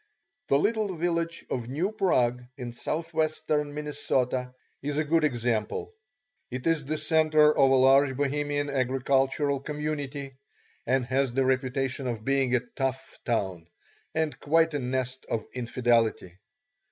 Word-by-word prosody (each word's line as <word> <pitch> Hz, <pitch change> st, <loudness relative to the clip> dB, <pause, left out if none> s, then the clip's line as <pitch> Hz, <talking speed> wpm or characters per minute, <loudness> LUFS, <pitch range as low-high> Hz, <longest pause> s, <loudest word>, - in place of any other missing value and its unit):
The 140 Hz, -, +4 dB
little 210 Hz, +2 st, 0 dB
village 170 Hz, 0 st, -1 dB
of 120 Hz, -2 st, -3 dB
New 165 Hz, +10 st, -1 dB
Prague 125 Hz, -, +1 dB
in 125 Hz, -2 st, -5 dB
southwestern 155 Hz, 0 st, -1 dB
Minnesota 130 Hz, -4 st, -1 dB, 0.3 s
is 145 Hz, +1 st, -3 dB
a 155 Hz, -, +2 dB
good 160 Hz, +1 st, +2 dB
example. 120 Hz, -6 st, -1 dB, 0.6 s
It 125 Hz, 0 st, -5 dB
is 165 Hz, -2 st, +2 dB
the 155 Hz, +3 st, -2 dB
centre 155 Hz, -1 st, +4 dB
of 135 Hz, -1 st, +5 dB
a 135 Hz, -, +5 dB
large 135 Hz, +1 st, +5 dB
Bohemian 145 Hz, 0 st, -1 dB
agricultural 135 Hz, +2 st, +1 dB
community, 145 Hz, -1 st, -4 dB, 0.5 s
and 130 Hz, +1 st, +2 dB
has 130 Hz, 0 st, 0 dB
the 135 Hz, +1 st, +2 dB
reputation 130 Hz, 0 st, 0 dB
of 115 Hz, -3 st, -4 dB
being 135 Hz, -2 st, +2 dB
a 120 Hz, -, +2 dB
"tough" 135 Hz, -1 st, -3 dB
town 95 Hz, -8 st, -1 dB, 0.5 s
and 160 Hz, -1 st, -1 dB
quite 165 Hz, +2 st, +3 dB
a 145 Hz, -, 0 dB
nest 130 Hz, 0 st, -3 dB
of 110 Hz, -, -2 dB
infidelity. 115 Hz, -6 st, 0 dB
135 Hz, 135 wpm, -27 LUFS, 125-150 Hz, 0.6 s, of